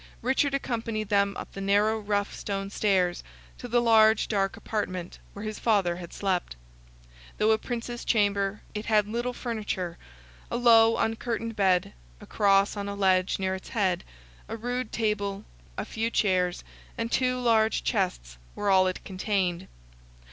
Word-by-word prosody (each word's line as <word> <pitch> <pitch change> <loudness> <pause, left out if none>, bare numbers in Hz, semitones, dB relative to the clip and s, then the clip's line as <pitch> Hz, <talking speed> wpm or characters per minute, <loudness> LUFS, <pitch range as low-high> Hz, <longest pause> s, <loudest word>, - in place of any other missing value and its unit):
Richard 270 +3 +2
accompanied 230 -5 -3
them 200 -1 +2
up - - -7
the 195 - -7
narrow 205 +3 +2
rough 205 -1 -1
stone 195 -1 -4
stairs, 185 -4 +1 0.4
to 245 - -6
the 240 0 +2
large 220 -1 +5
dark 195 -2 0
apartment, 185 -5 -4
where 205 +2 -7
his 215 0 -5
father 195 -6 +2
had 175 -1 -9
slept. 185 - -2 0.8
Though 215 +1 +3
a 220 - +3
Prince's 240 0 -5
chamber, 205 -2 +1
it 210 0 -5
had 210 -2 +3
little 240 +3 -2
furniture; 210 -8 -4 0.5
a - - -2
low 230 -2 +6
uncurtained 225 0 -2
bed, 185 -3 +2 0.3
a - - -12
Cross 195 -1 +3
on 200 -1 -4
a 200 - -4
ledge 190 -2 +2
near 190 -1 -1
its 190 - -7
head, 190 -7 0 0.5
a 225 - -4
rude 245 0 -3
table, 205 -3 -1 0.3
a - - -3
few 225 +1 -2
chairs, 185 -5 +1 0.3
and 230 0 -3
two 255 -1 +1
large 225 -2 +2
chests, - - -2 0.2
were 205 -1 0
all 185 -1 +5
it 185 - -4
contained. 190 -2 -1
205 Hz, 155 wpm, -27 LUFS, 195-225 Hz, 0.8 s, low